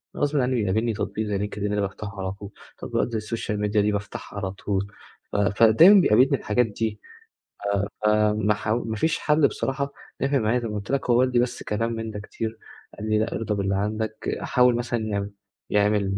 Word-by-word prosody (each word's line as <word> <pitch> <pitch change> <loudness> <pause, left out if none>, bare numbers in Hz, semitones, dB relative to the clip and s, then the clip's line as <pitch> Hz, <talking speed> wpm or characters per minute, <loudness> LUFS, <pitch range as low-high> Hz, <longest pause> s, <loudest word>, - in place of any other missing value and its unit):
أنا - - -6
غصبٍ 145 +1 +1
عنّي 130 0 +1
بيقابلني 110 +1 +1
تطبيق 105 +1 -3
زي 105 -1 -1
LinkedIn 105 +1 -3
ده 105 - +1
بافتحه 100 +1 -5
على 95 0 -2
طول، 100 +1 -9 0.3
تطبيقات - - -2
زي 115 - -1
السوشيال 110 -1 -3
ميديا 105 0 +2
دي 105 +1 +2
بافتحها 100 0 -5
على 95 -2 -3
طول 100 0 -2 0.4
ف - - -6
فدايمًا 115 - +6
بيقابلني 130 +2 +4
الحاجات 120 +2 +1
دي. 110 0 -3 1.1
آآ - - +5 0.2
آآ - - +1
ما 105 0 +2
ح 105 - -7
ما 110 0 -1
فيش 160 +9 0
حَل 150 -1 +3
بصراحة 140 +1 -3 0.3
نفع 135 0 +2
معايا 115 +2 +1
زي 120 - -4
ما 105 - -5
قُلت 100 +2 -5
لك 140 -2 -1
هو 120 0 +5
والدي 125 -1 +3
بس 125 0 -1
كلام 115 +2 -1
من 115 -1 -4
ده 105 - -6
كتير، 110 +2 -5 0.4
قال 110 +1 -4
لي: 110 0 +3
"لأ، 110 - -1
أرضى 110 -2 -2
باللي 100 -1 0
عندك." 110 +2 -2
حاول 125 -2 +3
مثلًا 120 0 -1
يع 100 -1 -1 0.6
يعمل 100 -2 +1
110 Hz, 205 wpm, -24 LUFS, 105-120 Hz, 1.1 s, فدايمًا